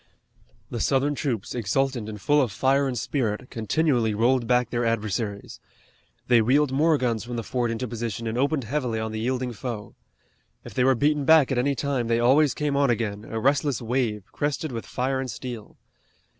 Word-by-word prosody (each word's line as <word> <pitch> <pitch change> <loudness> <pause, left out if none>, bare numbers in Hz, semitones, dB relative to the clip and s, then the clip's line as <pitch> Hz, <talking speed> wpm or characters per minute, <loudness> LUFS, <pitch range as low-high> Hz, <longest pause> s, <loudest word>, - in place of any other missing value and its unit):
The - - -3
Southern 140 +2 +1
troops, 125 -7 -3
exultant 120 +1 -1
and 105 -1 -7
full 145 +7 +3
of 125 -6 0
fire 135 +6 +2
and 125 -2 -3
spirit, 115 -1 -2
continually 115 -1 +1
rolled 120 +2 +2
back 125 -1 +2
their 120 0 0
adversaries. 110 -2 -2 0.7
They 120 -2 +5
wheeled 135 +5 +3
more 155 +3 +3
guns 120 -4 -1
from 120 +1 -6
the 115 - -3
fort 120 +2 -1
into 115 +2 -3
position 115 0 -4
and 110 0 -2
opened 140 +2 +1
heavily 120 -2 -2
on 110 0 -3
the 110 - -4
yielding 125 +1 -2
foe. 115 -2 -6 0.7
If - - -9
they 125 - +1
were 130 +1 +4
beaten 145 +3 +1
back 155 -1 +5
at 130 - +1
any 140 +3 +1
time 135 -4 -1
they 115 0 +2
always 135 +4 +4
came 150 -2 -1
on 140 -1 +3
again, 110 -3 -1
a 110 - -4
restless 140 +1 +1
wave, 115 -3 -1
crested 145 +1 -2
with 115 -2 -6
fire 130 +1 -1
and 130 -1 -3
steel. 115 -1 -7
125 Hz, 190 wpm, -25 LUFS, 115-135 Hz, 0.7 s, They